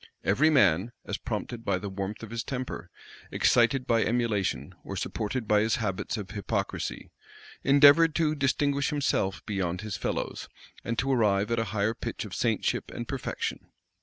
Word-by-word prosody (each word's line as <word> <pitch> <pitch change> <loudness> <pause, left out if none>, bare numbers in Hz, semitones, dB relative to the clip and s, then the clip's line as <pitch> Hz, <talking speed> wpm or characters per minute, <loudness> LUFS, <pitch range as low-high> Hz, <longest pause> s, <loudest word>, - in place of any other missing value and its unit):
Every 135 +11 +4
man, 105 - +3
as - - -3
prompted 115 -2 -4
by 95 - +1
the 100 +2 -5
warmth 100 +2 -5
of 115 - -8
his 115 0 -3
temper, 125 -9 -5 0.4
excited 125 +2 +3
by 115 -1 +3
emulation, 105 - 0
or - - -6
supported 110 +2 -3
by 105 0 +4
his 110 +1 +2
habits 105 -2 -2
of 105 -2 -6
hypocrisy, 100 -2 -3 0.5
endeavored 145 +3 +7
to 155 -2 +2
distinguish 140 0 +1
himself 140 -10 0
beyond 90 -4 -2
his 105 -3 -4
fellows, - - -3 0.3
and 115 0 -3
to 135 +3 +1
arrive 105 -4 +2
at 115 - +1
a 115 - 0
higher 105 0 0
pitch - - -5
of - - -9
saintship - - 0
and - - -6
perfection. - - -4
115 Hz, 165 wpm, -28 LUFS, 100-130 Hz, 0.5 s, endeavored